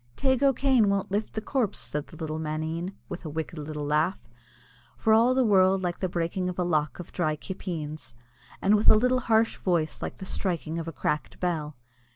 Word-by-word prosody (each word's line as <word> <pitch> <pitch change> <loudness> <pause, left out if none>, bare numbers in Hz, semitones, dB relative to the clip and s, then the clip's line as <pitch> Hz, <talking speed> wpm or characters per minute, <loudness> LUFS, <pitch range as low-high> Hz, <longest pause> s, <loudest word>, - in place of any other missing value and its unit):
"Teig 260 -1 +1
O'Kane 265 -5 +4
won't 200 -1 0
lift 210 +2 -1
the 220 - -3
corpse," 225 -2 0
said 150 0 -4
the - - -13
little 155 -1 -4
maneen, 160 +4 -3
with 175 - -7
a 160 - -5
wicked 160 +1 -4
little 150 0 -5
laugh, 155 +6 +1 0.8
for 220 - +3
all 235 +3 +5
the 260 - +4
world 190 -2 +4
like 175 -1 -2
the 185 - -1
breaking 175 +2 -1
of 180 - -6
a 180 - +1
lock 155 -4 0
of 175 - -9
dry 155 -4 0
kippeens, 155 -7 -6 0.5
and 200 - +4
with 210 - +4
a - - +8
little 250 +3 +3
harsh 225 -2 +2
voice 170 -4 0
like - - -5
the 190 - -7
striking 170 -4 -2
of 165 - -5
a - - -3
cracked 150 0 -2
bell. 155 -5 -2
180 Hz, 200 wpm, -27 LUFS, 155-210 Hz, 0.8 s, a